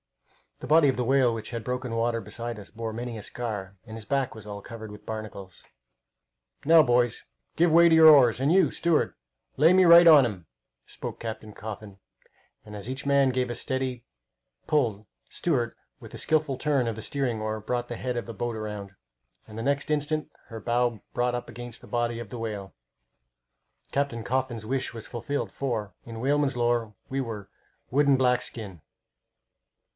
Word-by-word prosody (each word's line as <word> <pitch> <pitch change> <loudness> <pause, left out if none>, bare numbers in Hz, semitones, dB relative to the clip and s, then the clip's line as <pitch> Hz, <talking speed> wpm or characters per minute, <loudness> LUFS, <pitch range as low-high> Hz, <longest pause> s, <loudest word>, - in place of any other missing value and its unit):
The - - -6
body 150 0 +5
of 130 - 0
the 125 - 0
whale 130 -1 +3
which 110 -1 -5
had 115 -2 -4
broken 125 0 -3
water 115 0 0
beside 115 0 -6
us 100 - -11
bore 115 -1 -5
many 120 0 -5
a 105 - -8
scar, 100 -5 -5
and 110 -1 -9
his 110 -2 -9
back 135 +1 0
was 110 -2 -11
all 100 -1 -6
covered 110 -1 -9
with 105 - -13
barnacles. 110 -4 -7 1.0
"Now, 160 +1 +7
boys, 120 -2 +1 0.3
give 170 0 +3
way 170 +1 +7
to - - +3
your 160 0 +8
oars, 130 -6 +6
and 140 +3 +2
you, 180 -5 +5
steward, 170 -2 +1 0.4
lay 160 +6 +6
me 185 0 +6
right 170 0 +9
on 150 -4 +9
to 120 - +1
him!" 90 -5 -10 0.4
spoke - - -7
Captain 110 -2 -6
Coffin, 105 -2 -8 0.7
and 105 -1 -10
as 105 +3 -7
each 130 +2 -5
man 140 -1 +4
gave 125 -1 -1
a 120 - -3
steady 130 -2 -2 0.6
pull 115 -9 0 0.2
steward, 130 -9 -1 0.2
with - - -12
a - - -6
skilful 155 -4 +1
turn 135 -3 +1
of 115 - -2
the 110 - -7
steering 130 -5 -2
oar, 110 0 -2
brought 120 +3 -2
the 120 - -5
head 125 +1 -3
of 120 - -3
the 115 - -6
boat 120 +3 -3
round, 105 -2 -6 0.5
and 110 - -10
the 115 - -3
next 140 +2 0
instant 150 0 -1 0.2
her 115 -1 -8
bow 120 0 0
brought 120 0 0
up 120 - -5
against 120 0 -9
the - - -14
body 120 -1 -1
of 115 -4 -7
the 120 - -7
whale. 105 -4 -5 1.2
Captain 140 -5 -1
Coffin's 130 -3 -2
wish 130 +2 -2
was 115 -2 -8
fulfilled, 130 +4 -3
for, 110 -8 -3
in 115 -1 -8
whalemen's 140 +1 +1
lore, 120 -3 0
we 135 +1 -1
were 110 -5 -6 0.4
"wood 145 +3 +3
and 140 -1 +5
black 125 -1 +3
skin." 100 -8 -7
120 Hz, 190 wpm, -27 LUFS, 110-135 Hz, 1.2 s, right